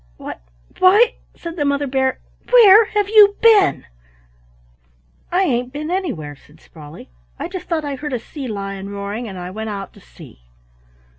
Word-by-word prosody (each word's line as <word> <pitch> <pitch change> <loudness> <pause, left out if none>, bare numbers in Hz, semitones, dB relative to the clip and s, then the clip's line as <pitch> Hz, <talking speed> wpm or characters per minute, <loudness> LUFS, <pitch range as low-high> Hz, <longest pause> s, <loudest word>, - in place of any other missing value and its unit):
"Why! - - -8 0.4
why!" 425 +6 +5 0.2
said 335 0 -8
the 295 - 0
Mother 280 0 0
Bear, 265 -1 -1 0.3
"where 450 -3 +7
have 415 -1 -1
you 415 -1 +6
been?" 430 -4 +4 1.5
"I 365 +2 +2
ain't 250 -6 -1
been 305 +4 -5
anywhere," 225 - -4
said 150 +3 -22
Sprawley. 150 - -14 0.3
"I - - -5
just 365 +1 -8
thought 320 -3 -2
I 285 - -3
heard 295 0 -6
a - - 0
sea 265 +4 -8
lion 195 -2 -6
roaring 200 +4 -5
and 190 -3 -8
I 180 0 -7
went 220 +2 -6
out 200 -2 -7
to - - -17
see." - - -16
280 Hz, 165 wpm, -19 LUFS, -, 1.5 s, where